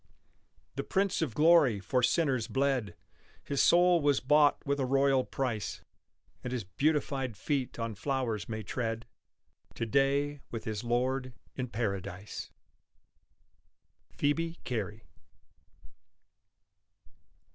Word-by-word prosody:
The -, -, -1 dB
Prince 195 Hz, -2 st, 0 dB
of 135 Hz, -9 st, -2 dB
Glory 150 Hz, -9 st, +5 dB
for 125 Hz, +7 st, 0 dB
sinners 130 Hz, -4 st, +2 dB
bled; 135 Hz, -8 st, 0 dB, 0.5 s
His 140 Hz, -, 0 dB
soul 175 Hz, 0 st, +5 dB
was 145 Hz, -2 st, +3 dB
bought 145 Hz, +2 st, +3 dB
with 140 Hz, 0 st, 0 dB
a 135 Hz, -, +1 dB
royal 135 Hz, 0 st, +3 dB
price; 120 Hz, -7 st, -3 dB, 0.6 s
And 125 Hz, -, -4 dB
his 125 Hz, -3 st, -2 dB
beautified 135 Hz, -, -1 dB
feet 135 Hz, +4 st, -2 dB
on 115 Hz, -1 st, -3 dB
flowers 115 Hz, -2 st, -2 dB
may 110 Hz, -1 st, -4 dB
tread 115 Hz, +1 st, -3 dB, 0.7 s
To 115 Hz, -, -2 dB
day 140 Hz, +3 st, +1 dB
with 115 Hz, -2 st, -5 dB
his 110 Hz, -1 st, -4 dB
Lord 130 Hz, +2 st, 0 dB, 0.2 s
in 130 Hz, -1 st, -3 dB
Paradise. 100 Hz, -4 st, -4 dB, 1.7 s
PHOEBE 165 Hz, +3 st, 0 dB
CARY. 110 Hz, -3 st, -4 dB
130 Hz, 110 wpm, -31 LUFS, 115-145 Hz, 1.7 s, Glory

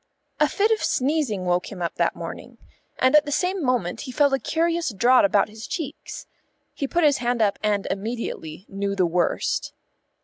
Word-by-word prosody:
A -, -, +4 dB
fit 425 Hz, +2 st, +1 dB
of 440 Hz, -, +2 dB
sneezing 260 Hz, -9 st, 0 dB
woke 180 Hz, 0 st, 0 dB
him 195 Hz, -, -8 dB
up 170 Hz, -1 st, -2 dB
that -, -, +1 dB
morning, -, -, -8 dB, 0.4 s
and 260 Hz, +3 st, +3 dB
at 300 Hz, -, +6 dB
the 290 Hz, -, -4 dB
same 365 Hz, +3 st, 0 dB
moment 245 Hz, -9 st, 0 dB
he 260 Hz, -, -6 dB
felt 285 Hz, +1 st, +3 dB
a 270 Hz, -, +2 dB
curious 335 Hz, +2 st, 0 dB
draught 240 Hz, +4 st, +4 dB
about 200 Hz, 0 st, +3 dB
his 215 Hz, +1 st, -10 dB
cheeks. 320 Hz, -6 st, -6 dB, 0.5 s
He 275 Hz, -, -3 dB
put 345 Hz, +4 st, 0 dB
his 290 Hz, -2 st, +4 dB
hand 245 Hz, 0 st, -1 dB
up 205 Hz, -3 st, +1 dB
and 210 Hz, -2 st, 0 dB
immediately 195 Hz, -5 st, -5 dB
knew 200 Hz, 0 st, -3 dB
the 185 Hz, -2 st, +2 dB
worst. 175 Hz, +1 st, 0 dB
240 Hz, 190 wpm, -24 LUFS, 200-295 Hz, 0.5 s, at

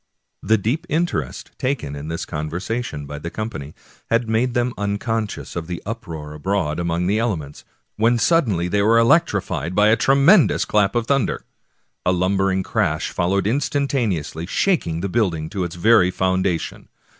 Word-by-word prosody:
The 110 Hz, +3 st, +3 dB
deep 115 Hz, -, -2 dB
interest 150 Hz, -, -2 dB
taken 125 Hz, -, -2 dB
in 70 Hz, +1 st, -7 dB
this 85 Hz, +3 st, -4 dB
conversation 85 Hz, +3 st, -4 dB
by 75 Hz, +1 st, -7 dB
the 85 Hz, -, -5 dB
com 110 Hz, +5 st, -4 dB
pany 75 Hz, -1 st, -8 dB, 0.3 s
had 115 Hz, 0 st, +1 dB
made 120 Hz, +3 st, 0 dB
them 120 Hz, 0 st, +1 dB
unconscious 105 Hz, +2 st, -3 dB
of 85 Hz, -2 st, -4 dB
the 90 Hz, -1 st, -4 dB
uproar 85 Hz, -10 st, -6 dB
abroad 85 Hz, 0 st, -1 dB
among 85 Hz, 0 st, -1 dB
the 100 Hz, +4 st, +1 dB
elements, 85 Hz, -12 st, -3 dB, 0.3 s
when 115 Hz, +3 st, +3 dB
suddenly 115 Hz, -, +2 dB
they 100 Hz, +3 st, +1 dB
were 110 Hz, +3 st, +4 dB
electrified 115 Hz, -, +2 dB
by 105 Hz, +1 st, +5 dB
a 110 Hz, -, +5 dB
tremendous 140 Hz, -, +4 dB
clap 105 Hz, +1 st, +2 dB
of 120 Hz, -1 st, +1 dB
thunder. 135 Hz, -4 st, 0 dB, 0.6 s
A 90 Hz, -, +2 dB
lumbering 95 Hz, +1 st, +1 dB
crash -, -, -1 dB
followed 95 Hz, +2 st, 0 dB
instantaneously, 120 Hz, -, -1 dB
shaking 90 Hz, -, 0 dB
the 100 Hz, -, -1 dB
building 90 Hz, -7 st, -1 dB
to 100 Hz, -3 st, -2 dB
its 85 Hz, -1 st, -5 dB
very 90 Hz, 0 st, +5 dB
foundation. 95 Hz, -2 st, -1 dB
100 Hz, 155 wpm, -21 LUFS, 85-115 Hz, 0.6 s, by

